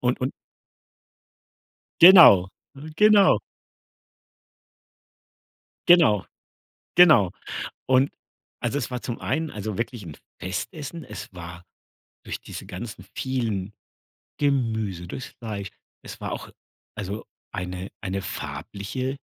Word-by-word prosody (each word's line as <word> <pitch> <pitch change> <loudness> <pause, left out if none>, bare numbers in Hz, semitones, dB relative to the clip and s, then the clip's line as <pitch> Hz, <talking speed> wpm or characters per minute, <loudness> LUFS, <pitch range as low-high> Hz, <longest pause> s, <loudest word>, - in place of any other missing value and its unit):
Und 125 +2 0
und 130 +1 -1 1.7
Genau, 170 - +9 0.3
äh, 140 +3 -10
genau. 210 -1 +6 2.5
Genau, 160 - +6 0.7
genau. 155 - +7 0.6
Und 130 +1 +3 0.5
also, 140 - -1
es 140 - -3
war 125 -1 -4
zum 120 - -5
einen 160 0 -2
also 105 -1 -5
wirklich 115 -1 -4
'n 80 -3 -9 0.2
Festessen. 145 - -5
Es - - -9
war 85 0 -9 0.6
durch - - -5
diese - - -9
ganzen 100 0 -8
vielen 110 -7 -2 0.7
Gemüse, 110 -10 0
durchs 125 +8 -6
Fleisch 105 -4 -6 0.3
es - - -10
war - - -4
auch - - -6 0.4
also 100 +2 -5 0.3
eine 90 +1 -5
eine 95 -1 -3
farbliche 125 +11 -5
115 Hz, 105 wpm, -24 LUFS, 95-140 Hz, 2.5 s, Genau